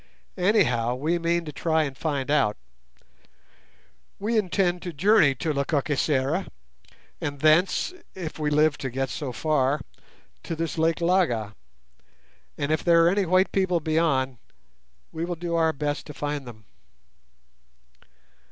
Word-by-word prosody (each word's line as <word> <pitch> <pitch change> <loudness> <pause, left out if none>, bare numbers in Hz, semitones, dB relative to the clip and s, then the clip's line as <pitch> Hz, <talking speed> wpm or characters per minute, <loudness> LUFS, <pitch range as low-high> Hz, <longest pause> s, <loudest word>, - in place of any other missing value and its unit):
Anyhow, 130 - +2
we 160 +6 -1
mean 170 0 0
to 150 - -6
try 160 +2 +1
and 140 -3 -5
find 145 -2 -2
out. 135 -8 +2 1.6
We 220 +4 -2
intend 185 -3 +1
to 175 -2 -6
journey 165 -3 +4
to 155 +4 -2
Lekakisera, 140 +3 0 0.7
and 145 -1 -4
thence, 165 - +3 0.2
if 170 -4 -6
we 150 -1 0
live 150 0 +2
to 130 - -3
get 135 +1 -3
so 140 -4 -4
far, 145 +1 +1 0.6
to 165 - -5
this 165 0 -3
Lake 165 +1 +1
Laga; 165 - +1 1.0
and, 145 +1 -2
if 155 - 0
there 170 -1 +5
are - - +6
any 195 0 +1
white 185 +2 +3
people 185 -3 +1
beyond, 150 -6 0 0.7
we 160 - -4
will 175 0 -3
do 170 +1 -4
our 165 -1 +3
best 145 -1 -3
to 150 - -9
find 145 -2 -4
them." 110 -3 -12
155 Hz, 140 wpm, -25 LUFS, 140-170 Hz, 1.6 s, are